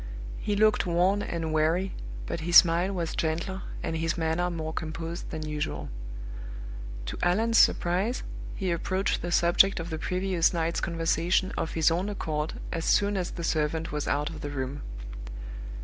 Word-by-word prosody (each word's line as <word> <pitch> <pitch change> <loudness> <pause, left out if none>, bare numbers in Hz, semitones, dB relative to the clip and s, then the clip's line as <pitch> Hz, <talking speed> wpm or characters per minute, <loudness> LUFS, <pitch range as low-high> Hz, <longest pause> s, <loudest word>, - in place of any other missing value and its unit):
He 205 - -1
looked 215 -2 +4
worn 180 +4 +3
and 165 -4 -2
weary, 165 +5 +2 0.3
but - - -3
his 175 +2 -1
smile 175 +2 +6
was 170 -4 -2
gentler 170 +4 -1 0.2
and 165 -1 -2
his 165 +1 0
manner 165 +2 +1
more 160 -2 -4
composed 165 +2 -4
than 155 -1 -4
usual. 150 -1 -3 1.2
To - - -5
Allan's 225 +6 +3
surprise 190 +8 +3 0.3
he 190 -2 -1
approached 185 +3 0
the 175 - -3
subject 175 +3 +5
of 165 +1 -5
the 160 - -3
previous 185 0 +1
night's 165 0 0
conversation 170 +2 +1
of 160 - -2
his 160 0 +4
own 180 +5 0
accord 155 -6 -2 0.2
as 165 - -2
soon 205 0 +3
as 185 -2 -1
the 170 - -6
servant 160 0 0
was 150 0 -2
out 145 +2 0
of 155 - -8
the 145 - -4
room. 140 0 -3
170 Hz, 165 wpm, -28 LUFS, 160-185 Hz, 1.2 s, smile